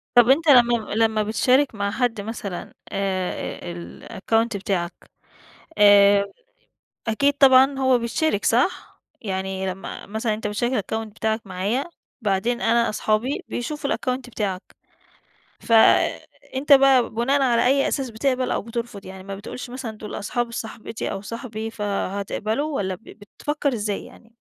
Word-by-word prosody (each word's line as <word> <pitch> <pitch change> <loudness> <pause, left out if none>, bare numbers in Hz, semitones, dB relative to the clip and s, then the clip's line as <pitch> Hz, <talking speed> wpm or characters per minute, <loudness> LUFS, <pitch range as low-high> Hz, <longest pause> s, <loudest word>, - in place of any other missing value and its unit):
طب 240 0 +7
أنت 320 +5 +4
لمّا 240 -4 +5
لمّا 220 -1 +2
بتشارك 250 +5 +2
مع 200 -1 -1
حد 230 -2 -1
مثلًا 200 -4 -6 0.2
آآ 185 -2 -3
ال 170 0 -10
الأكونت 225 +2 0
بتاعك، 180 -3 -2 0.9
آآ، 200 -1 +7 0.8
أكيد 280 +6 +2
طبعًا 270 0 +6
هو 260 -2 +3
بيشترك 235 0 -1
صح؟ 245 +10 0 0.2
يعني 190 -2 -3
لمّا 190 +1 -8
مثلًا 220 +1 -1
أنت 215 0 -5
بتشارك 230 +4 -1
الأكونت 220 -1 -3
بتاعك 220 0 -1
معايا 195 +8 -1 0.4
بعدين 215 +3 0
أنا 235 0 +2
أصحابي 215 +5 -1
بيشوفوا 280 +4 -3
الأكونت 255 -3 -2
بتاعك. 195 -4 -3 1.0
ف - - -4 0.8
أنت 280 +3 +1
بقى 270 -3 +6
بناءً 270 +5 +1
على 240 -2 +3
أي 275 +2 +3
أساس 270 -3 -2
بتقبل 255 +2 0
أو - - -1
بترفض؟ 230 -2 -6
يعني 190 0 -9
ما 195 0 -6
بتقولش 240 +4 -8
مثلًا 255 -2 -5
دول 210 -1 -8
أصحاب 235 +3 -2
صاحبتي 225 -1 -5
أو 195 - -4
صاحبي 225 0 -6
فهتقبلوا 210 +6 -2
والّا 190 -2 -1
ب 185 - -15 0.4
بتفكّر 295 -1 -1
إزاي 210 -3 -2
يعني؟ 230 0 -17
225 Hz, 140 wpm, -23 LUFS, 200-255 Hz, 1.0 s, طب